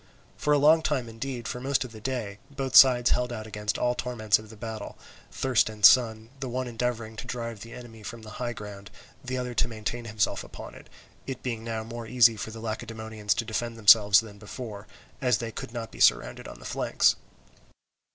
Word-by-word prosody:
For 150 - -1
a 145 - +6
long 155 +3 +5
time, 145 -6 -1
indeed 120 0 -5
for 125 - -5
most 135 +1 +1
of 125 - -9
the 110 -1 -11
day, 110 -5 -4
both 135 -2 -4
sides 125 -2 +8
held 125 0 +1
out 110 -2 -5
against 105 -1 -3
all 120 - +1
the - - -3
torments 110 -4 +1
of 110 0 -13
the 110 - -11
battle, 110 0 -7 0.3
thirst, 130 -4 +2
and 105 -1 +2
sun, 115 -2 +5
the 130 -1 -4
one 130 +1 -2
endeavouring 115 -2 -3
to 120 - -7
drive 115 -3 -5
the 115 +3 -10
enemy 115 -3 -11
from 115 +2 -8
the 110 - -10
high 120 -1 -2
ground, 105 -2 -9 0.3
the 130 0 -3
other 125 -1 -3
to 115 - +1
maintain 115 +1 -5
himself 105 -1 -1
upon - - -10
it, - - -14 0.4
it 130 -2 -6
being 115 -3 -3
now 115 -1 -3
more 115 0 -7
easy 120 -2 +5
for 105 - -5
the 110 +1 -9
Lacedaemonians 110 -1 -3
to 115 - -2
defend 115 +1 -3
themselves 105 -2 +7
than 105 -3 -12
before, 105 -1 -8 0.3
as 125 -4 +3
they 115 0 -5
could 110 - -7
not 115 -2 -6
be - - -12
surrounded 60 0 +3
on - - -10
the - - -14
flanks. - - +2
115 Hz, 210 wpm, -27 LUFS, 110-125 Hz, 0.4 s, sides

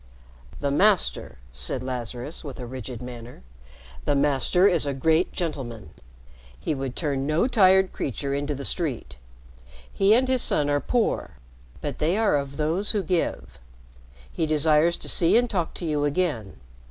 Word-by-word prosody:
"The 140 - 0
Master," 185 - +2
said 60 - -1
Lazarus, 125 +4 -4
with 140 -4 -8
a 125 - -5
rigid 125 -1 -7
manner, 120 - -10 0.6
"the 145 - +1
Master 145 +6 +2
is 170 -7 +2
a 140 - -2
great 160 +6 +2
gentleman. 125 - -5 0.7
He 155 - -2
would 135 -3 -4
turn 140 -4 -2
no 155 +10 +2
tired 190 -6 +4
creature 140 +2 -3
into 145 +1 -2
the 140 0 -4
street. 130 - -3 0.8
He 200 +2 +4
and 260 +2 +2
his 255 -1 +3
son 145 -1 +2
are 145 - +2
poor, 180 - -1 0.4
but 145 -3 -5
they 165 +6 +1
are 220 -7 +2
of 140 -1 -3
those 165 +8 +1
who 205 -2 0
give. 175 0 -2 0.7
He 160 - -1
desires 155 +2 +3
to - - -5
see 170 +5 +4
and 245 +1 +2
talk 180 -8 -2
to 175 - -5
you 150 -2 0
again. 145 - -2
145 Hz, 160 wpm, -25 LUFS, 130-175 Hz, 0.8 s, tired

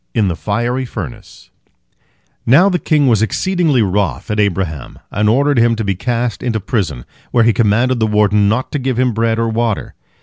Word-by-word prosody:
IN 105 -3 +2
THE 85 - -2
FIERY 120 +7 -2
FURNACE 115 -3 -9 0.9
Now 160 +11 +5
the 180 -2 0
king 150 -4 +1
was 115 -4 +3
exceedingly 160 - +1
wroth 100 +2 -2
at 105 - -1
Abraham, 90 -8 -2
and 105 +1 +1
ordered 140 +3 +2
him 115 0 +3
to 110 - -3
be 100 -1 0
cast 115 +1 -2
into 115 -3 -1
prison, 95 - -3 0.2
where 120 - +2
he 115 0 +3
commanded 120 +3 +1
the 110 - +1
warden 105 -1 +2
not 115 +5 -1
to 145 - -2
give 130 -2 -2
him 125 -1 +1
bread 115 +1 0
or 115 0 0
water. 115 -1 -2
115 Hz, 190 wpm, -16 LUFS, 105-125 Hz, 0.9 s, Now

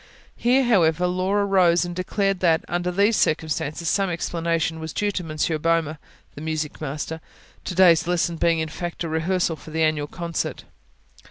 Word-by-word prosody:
Here, 255 +3 +3
however, 180 -8 +3
Laura 185 +3 +1
rose 180 -3 +3
and 175 0 -6
declared 195 +1 -1
that, 165 -3 +2
under 175 +1 -1
these 200 +5 +2
circumstances, 160 0 -1
some 195 +3 +1
explanation 165 -1 -1
was 160 -1 -6
due 205 0 0
to 185 - -4
Monsieur 155 0 -1
Boehmer, 165 -1 0 0.3
the 145 - -10
music 155 -1 -3
master, 155 +2 -4 0.4
to 180 - -4
day's 170 -2 +5
lesson 170 -1 0
being 165 0 +2
in 160 0 -2
fact 175 +2 -5
a - - -3
rehearsal 165 +2 0
for - - -13
the 160 +1 0
annual 155 -2 +1
concert. 170 +1 -4
170 Hz, 170 wpm, -23 LUFS, 160-180 Hz, 0.4 s, day's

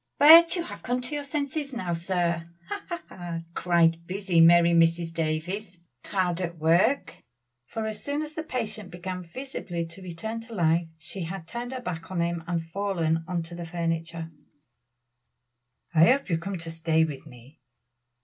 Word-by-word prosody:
"But 330 +4 +9
you 345 - -1
have - - -8
come 245 0 -1
to 250 +3 -5
your 290 -1 -2
senses 280 0 -3
now, 185 -8 -2
sir! 170 -1 -1 0.2
ha! 405 - -5
ha! 345 -1 -4
ha!" 175 -2 -6
cried 170 -1 +3
busy, 185 -3 +2
merry 170 +1 +7
Mrs. 165 0 +3
Davies, 170 +5 -2 0.3
hard 185 -3 0
at 170 -1 -3
work. 170 - +2 0.5
For 225 - -4
as 215 -1 -5
soon 285 +2 -1
as 305 0 -8
the 315 - -3
patient 220 - -4
began 180 +1 -5
visibly 175 -4 -5
to 170 +3 -12
return 185 +6 -5
to 230 0 -9
life, 165 -1 +2
she 165 +3 -6
had 170 -1 -6
turned 240 +5 -5
her 260 -1 -4
back 170 -7 -5
on 185 -2 -2
him 170 0 -1
and 170 -2 -1
fallen 165 -3 0
on 175 -2 -1
the 170 +1 -7
furniture. 165 -1 -3 1.6
"I 160 0 +7
hope 270 +5 +3
you - - +4
are - - -6
come 190 +3 -4
to 165 -1 -6
stay 160 0 +2
with 155 0 -7
me." 125 +2 -15
175 Hz, 175 wpm, -27 LUFS, 165-220 Hz, 1.6 s, But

